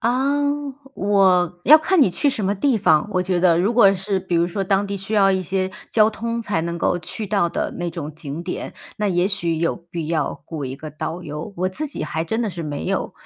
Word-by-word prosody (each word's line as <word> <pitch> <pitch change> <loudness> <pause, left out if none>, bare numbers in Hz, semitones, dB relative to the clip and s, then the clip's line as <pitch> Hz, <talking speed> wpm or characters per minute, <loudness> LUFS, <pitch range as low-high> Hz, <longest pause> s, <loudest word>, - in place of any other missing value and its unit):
啊， 265 +5 +1 0.5
我 185 -3 +2
要 305 - +9
看 355 +3 +2
你 260 - +6
去 280 +10 +1
什 220 - -2
么 200 +2 +1
地 240 +2 +1
方， 155 -5 +3
我 185 -1 +1
觉 185 -1 0
得。 170 -2 +4
如 215 +5 +1
果 195 -5 +6
是 190 +1 -1
比 185 -2 -4
如 170 +1 +2
说 195 +2 -2
当 195 +1 +1
地 200 0 -3
需 195 +3 -6
要 195 -2 +5
一 190 -1 +1
些 190 +2 -1 0.2
交 215 -1 +5
通 230 +2 -3
才 205 -6 -1
能 170 0 -3
够 175 - +1
去 210 +6 -5
到 195 -4 +1
的 - - -2
那 175 -1 -2
种 155 -3 -6
景 155 +1 -6
点， 180 - -5 0.2
那 210 -1 0
也 180 +1 +2
许 170 -5 0
有 165 +1 0
必 170 -3 -7
要 155 -3 -2
雇 155 -4 -5
一 130 0 -4
个 155 +1 -8
导 165 +4 -5
游。 150 +5 -6
我 185 +1 0
自 305 +12 -3
己 285 - -5
还 160 -1 -3
真 220 +7 -2
的 225 - 0
是 170 -2 -5
没 145 -2 -4
有 - - -2
185 Hz, 260 characters per minute, -21 LUFS, 170-210 Hz, 0.5 s, 要